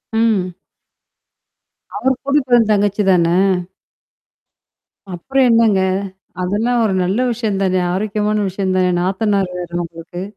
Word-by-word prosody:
ம். 215 -5 +1 1.4
அவரு 260 +5 +1
கூட்டிட்டு 275 -2 0
வந்த 225 -3 +4
தங்கச்சி 205 0 +1
தானே! 170 -1 +3 1.8
அப்புறம் 265 +10 0
என்னாங்க? 225 -4 +4 0.6
அதெல்லாம் 225 +6 0
ஒரு 200 -3 0
நல்ல 185 +5 -1
விஷயம் 220 -4 -2
தானே! 185 -1 +1
ஆரோக்கியமான 210 +2 -1
விஷயம் 190 0 -2
தானே! 185 -1 +2
நாத்தனாரு 195 +1 0
வேற 175 -1 -6
உங்களுக்கு. 170 +2 -9
200 Hz, 110 wpm, -17 LUFS, 185-225 Hz, 1.8 s, வந்த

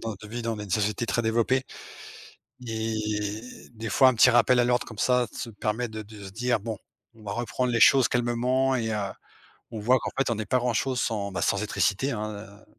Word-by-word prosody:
Dans 115 - -3
notre 105 0 -9
vie, 120 +1 -5
dans 115 -1 -2
une 105 -2 -7
société 105 +3 0
très 120 - 0
développée 115 +4 +1 1.0
et 110 -2 -2 0.3
des 110 0 -5
fois 130 +6 +5
un 130 - +2
petit 110 - +6
rappel 120 +1 +4
à - - +3
l'ordre 125 0 +1
comme 110 -3 -11
ça, 125 +1 +2
se 115 - -6
permet 110 +3 -2
de 110 0 -6
de 105 -1 -12
se 95 - -8
dire: 120 +1 0
«Bon. 110 0 -4 0.4
On 110 -1 -17
va 100 - -4
reprendre 120 +2 -2
les 115 - +1
choses 135 -1 +6
calmement», 125 +2 +1
et 115 -2 -2
heu, - - -1 0.8
on 110 - -5
voit 125 +4 +4
qu'en - - -4
fait, 135 -3 +1
on 115 - 0
n'est 110 0 -4
pas 125 - +2
grand-chose 125 +1 0
sans, 100 -3 -2
bah 95 - -3
sans - - +2
électricité, 130 +8 0
hein. 110 -1 -3
Heu, 100 0 -11
115 Hz, 220 wpm, -26 LUFS, 105-125 Hz, 1.0 s, petit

